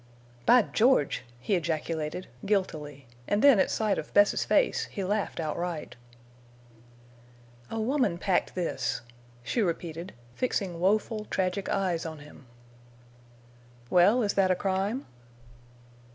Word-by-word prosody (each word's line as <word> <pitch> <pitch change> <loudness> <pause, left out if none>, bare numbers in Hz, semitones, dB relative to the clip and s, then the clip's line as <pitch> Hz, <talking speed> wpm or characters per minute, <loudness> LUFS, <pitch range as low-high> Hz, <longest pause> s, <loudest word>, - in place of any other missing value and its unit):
"By 245 -2 +7
George!" 225 - +2 0.2
he 200 - -2
ejaculated, 160 -1 -2 0.2
guiltily, 155 -9 -2 0.2
and 205 +1 +1
then 280 -7 +7
at - - +3
sight 215 -2 0
of - - -8
Bess's 205 0 +5
face - - +2
he 195 - -5
laughed 205 0 -1
outright. 165 +1 -3 1.7
"A 225 - -3
woman 245 -5 +1
packed 180 +1 0
this," 165 -8 -2 0.4
she 235 - -1
repeated, 170 -1 -3 0.2
fixing 195 - -2
woeful, 210 +3 +1
tragic 185 0 -2
eyes 185 -5 0
on 160 -1 -6
him. 150 -3 -14 1.4
"Well, 200 +7 +5
is 205 - 0
that 195 -1 +3
a 185 - +3
crime?" 195 +7 -1
190 Hz, 120 wpm, -28 LUFS, 165-210 Hz, 1.7 s, By